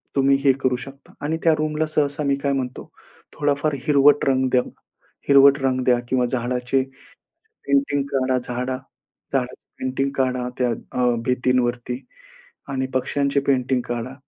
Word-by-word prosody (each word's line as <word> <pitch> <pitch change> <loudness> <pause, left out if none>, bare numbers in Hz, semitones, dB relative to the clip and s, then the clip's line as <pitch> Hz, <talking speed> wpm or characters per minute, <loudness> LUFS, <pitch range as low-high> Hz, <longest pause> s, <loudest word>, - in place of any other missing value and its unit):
तुम्ही 135 0 +4
हे 140 - +6
करू 130 -2 +2
शकता. 135 +2 -12
आणि 155 +2 -1
त्या 165 - +5
रूमला 155 0 0
सहसा 150 -1 0
मी 140 -1 +2
काय 140 - +1
म्हणतो 130 -2 -4 0.4
थोडाफार 145 +1 0
हिरवट 145 0 +5
रंग 130 -1 +2
द्या. 125 - +4 0.7
हिरवट 140 0 +7
रंग 130 -1 +1
द्या 125 -1 +4
किंवा 125 -1 +2
झाडाचे 125 +1 -1 0.9
पेंटिंग 275 - +2
काढा, 130 -1 +1
झाडा 125 +1 -3 0.6
झाडाची 125 -2 -1 0.2
पेंटिंग 130 +1 -1
काढा 125 -2 0
त्या 125 -1 +1
अ, 125 +1 -1
भिंतीवरती 125 -1 0 0.7
आणि 130 -1 -2
पक्ष्यांचे 140 +2 +1
पेंटिंग 130 -1 +2
काढा. 120 +2 -3
130 Hz, 140 wpm, -22 LUFS, 125-140 Hz, 0.9 s, हिरवट